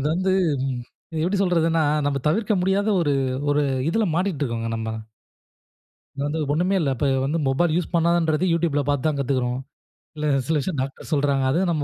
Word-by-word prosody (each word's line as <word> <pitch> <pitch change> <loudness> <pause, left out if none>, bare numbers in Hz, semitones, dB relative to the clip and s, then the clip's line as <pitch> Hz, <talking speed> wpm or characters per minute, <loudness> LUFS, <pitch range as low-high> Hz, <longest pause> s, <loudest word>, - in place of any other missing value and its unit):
இது 140 - -1
வந்து 185 +1 0 0.9
எப்பிடி 190 +3 0
சொல்றதுன்னா, 165 -3 +2 0.2
நம்ம 140 -1 0
தவிர்க்க 210 +5 +1
முடியாத 195 +3 +1
ஒரு 145 -4 +1 0.4
ஒரு 145 0 +2 0.3
இதில 220 +2 +1
மாட்டிட்டு 180 -4 -1
இருக்கோங்க 115 -2 -3
நம்ம. 110 0 -3 1.3
அது 140 - -3
வந்து 160 +2 -2
ஒண்ணுமே 180 +5 +1
இல்ல. 150 - +1
இப்ப 140 - -1 0.2
வந்து 150 +4 0
மொபைல் 155 +5 +2
யூஸ் 175 -1 -1
பண்ணாதன்றது 170 0 +2
Youtubeல 160 -4 +1
பார்த்து 145 0 0
தான் 150 -2 0
கத்துக்கிறோம். 130 -2 0 0.6
இல்ல 150 - -3 0.2
சில 160 - +1
விஷயம் 145 -1 -3
டாக்டர் 135 +4 -6
சொல்றாங்க. 140 -2 +2
அதுவும் 175 +6 +1
நம்ம 155 -3 0
155 Hz, 165 wpm, -23 LUFS, 140-175 Hz, 1.3 s, சொல்றதுன்னா